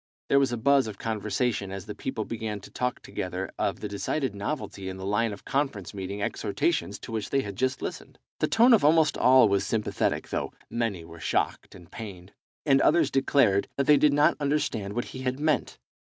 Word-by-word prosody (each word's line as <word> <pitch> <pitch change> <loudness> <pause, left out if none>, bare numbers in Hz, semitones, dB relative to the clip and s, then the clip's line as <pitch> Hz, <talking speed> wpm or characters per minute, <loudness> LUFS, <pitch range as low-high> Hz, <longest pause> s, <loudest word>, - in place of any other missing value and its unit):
There 140 - +5
was 135 -2 +2
a 120 - -1
buzz 135 +2 +3
of 105 -2 -7
conversation 110 -1 -1
as 95 0 -6
the 105 - -6
people 110 -3 -4
began 110 -2 -4
to - - -13
talk 125 0 -2
together 90 +1 -4
of - - -1
the - - -3
decided 120 +5 -2
novelty 100 -3 -4
in 95 - -6
the 95 - -6
line 105 +3 +1
of 100 - -10
conference 135 - -2
meeting 100 +1 -4
exhortations 100 0 -1
to - - -10
which 110 -2 -3
they 140 - +2
had 100 -5 -6
just 130 +4 -1
listened. - - -6 0.2
The - - +2
tone 235 +2 +5
of 220 - +5
almost 155 +1 +4
all 130 -2 +6
was 100 -1 +1
sympathetic, 105 +1 -1
though - - -3 0.2
many 110 -8 -2
were 85 0 -12
shocked 75 - -1
and 85 -3 -15
pained, 100 -4 -9 0.3
and 135 -2 +4
others 155 -3 +3
declared 135 -7 +3
that 140 - +1
they 150 0 +6
did 150 0 +4
not 145 +1 +4
understand 140 -9 -1
what 120 - -1
he 130 - -6
had 130 +1 -2
meant. 155 0 0
115 Hz, 205 wpm, -27 LUFS, 100-140 Hz, 0.3 s, all